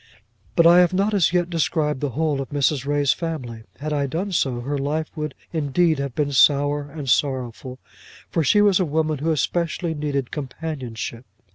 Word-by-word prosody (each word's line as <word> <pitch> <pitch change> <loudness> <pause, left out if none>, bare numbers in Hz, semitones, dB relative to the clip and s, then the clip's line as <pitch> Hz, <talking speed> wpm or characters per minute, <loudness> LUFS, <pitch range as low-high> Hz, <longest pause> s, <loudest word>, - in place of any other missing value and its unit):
But 170 - +5
I 170 +1 +8
have 180 0 +4
not 200 +3 +1
as 190 -5 +3
yet 175 -1 +1
described 155 -3 0
the 145 - 0
whole 155 -3 0
of 135 - -6
Mrs. 145 -1 0
Ray's 145 -2 +2
family. 125 -10 -5
Had 150 +2 -3
I 140 -1 0
done 180 +8 -3
so, 130 -8 0
her 140 +4 -3
life 150 +3 -2
would 150 -1 -4 0.2
indeed 160 +1 +1
have 140 -3 -4
been 145 -2 0
sour, 145 +2 +3
and 145 -1 -7
sorrowful, 130 -1 -1 0.5
for 165 - 0
she 205 +7 +4
was 200 -2 +4
a - - +3
woman 155 -1 -1
who 160 +3 -1
especially 165 +2 -1
needed 145 -4 -3
companionship. 130 -5 -5
150 Hz, 180 wpm, -22 LUFS, 140-165 Hz, 0.5 s, I